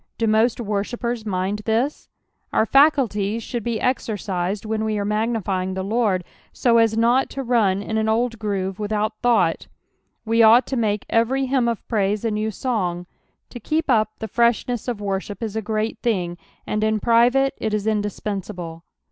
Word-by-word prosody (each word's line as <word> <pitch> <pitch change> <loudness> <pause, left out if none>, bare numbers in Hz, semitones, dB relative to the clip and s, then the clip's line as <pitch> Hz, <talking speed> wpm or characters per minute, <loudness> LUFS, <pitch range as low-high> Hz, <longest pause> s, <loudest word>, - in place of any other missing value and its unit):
Do 230 - 0
most 220 +3 +2
worshippers 230 +2 -3
mind 190 +1 -1
this? 235 +6 -1 0.4
Our 220 - +2
fscullies 230 -6 +3
should 240 -3 -4
be 230 -1 -2
exercised 205 -5 -2
whea 220 0 -2
we 215 -1 -1
are 200 - -1
uiagmfyiug 205 -4 -1
the 190 - -2
Lord, 205 -3 +1 0.3
so 235 -2 +3
as 225 -1 +3
not 240 +3 +3
to 270 - -5
lun 210 -6 +2
in 220 +1 -1
an 220 0 0
old 230 0 0
groove 195 -3 -2
without 215 +1 -2
thought; 215 -9 +2 0.6
we 225 +1 +3
ought 225 +3 +7
to 265 - -3
miUio 210 -4 0
ever; 230 +3 +2
hymn 265 -2 +1
of 235 -2 -3
praise 210 -1 0
a 225 - +1
new 215 +1 -1
song. 185 -7 -2 0.5
To 245 - -7
ketp 310 +6 -1
up 215 -4 +3
the 220 - -5
freshness 235 +1 +1
of 235 -4 -3
worship 200 +2 -3
is 220 -2 -4
a 220 - -1
great 215 +1 -2
thing, 180 -7 -1 0.3
and 215 0 -1
in 220 0 +1
private 245 +4 +3
it 220 - -2
is 210 -1 -1
indispensable. 200 -5 -3
220 Hz, 175 wpm, -22 LUFS, 205-235 Hz, 0.6 s, ought